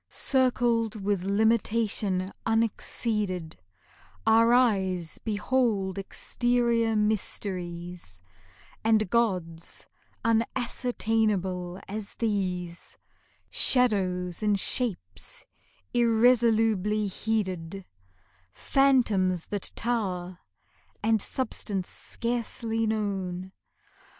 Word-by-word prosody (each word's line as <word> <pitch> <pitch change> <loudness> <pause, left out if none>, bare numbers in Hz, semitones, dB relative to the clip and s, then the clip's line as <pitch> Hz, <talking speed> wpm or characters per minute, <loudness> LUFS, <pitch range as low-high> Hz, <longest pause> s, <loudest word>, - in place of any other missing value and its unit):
Circled 240 -4 +1
with 200 -2 -1
limitation 210 -2 +1
unexceeded 210 -5 -1 0.7
Our 230 +1 +5
eyes 190 -9 +2
behold 210 -3 0
exterior 235 +2 0
mysteries 180 - -2 0.6
And 215 -3 +2
gods 180 -8 -1 0.4
unascertainable 220 -6 0
as 205 0 -5
these 180 -6 -3 0.5
Shadows 185 -8 +3
and 210 -2 +2
shapes 185 - -3 0.5
irresolubly 225 -3 +3
heeded; 195 -3 -2 0.7
Phantoms 210 - +2
that 205 -2 -2
tower, 185 -7 -2 0.6
and 220 -1 +3
substance 205 -7 -3
scarcely 230 -1 -2
known. 190 -4 -2
210 Hz, 65 wpm, -27 LUFS, 185-230 Hz, 0.7 s, Our